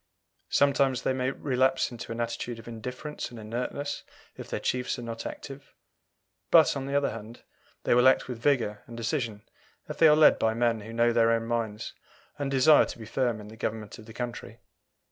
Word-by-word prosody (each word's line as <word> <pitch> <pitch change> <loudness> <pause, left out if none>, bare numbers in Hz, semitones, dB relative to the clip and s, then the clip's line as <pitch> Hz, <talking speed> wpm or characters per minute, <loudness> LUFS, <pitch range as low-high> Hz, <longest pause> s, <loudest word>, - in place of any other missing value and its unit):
Sometimes 140 -2 +2
they 130 - +1
may 130 0 0
relapse 130 -1 +1
into 120 -1 -8
an 115 - -5
attitude 120 0 -3
of 115 - -12
indifference 125 +6 -6
and 120 -2 -10
inertness 125 +6 -4 0.3
if - - -9
their - - -2
chiefs 125 0 -1
are 120 - -7
not 115 -1 -5
active; 135 0 -10 0.7
but, - - +6
on 135 -1 -4
the 140 - -2
other 140 0 +2
hand, 115 +1 -10 0.4
they - - +2
will 125 +2 +6
act 130 - +4
with 125 -3 -6
vigour 115 -6 +1
and 115 - -9
decision 115 -3 -2 0.4
if - - -7
they 160 - +8
are 150 - +7
led 155 0 +6
by 110 0 +1
men 115 -1 +1
who 110 +2 -9
know 120 +1 +2
their 115 -1 +4
own 115 0 +1
minds 115 -2 -3 0.5
and 140 -1 -1
desire 140 +3 +6
to - - -8
be 115 - -9
firm 120 0 -1
in 105 0 -10
the 110 - -11
government 110 0 -5
of 110 - -13
the - - -10
country. 120 -1 -6
120 Hz, 200 wpm, -28 LUFS, 115-130 Hz, 0.7 s, they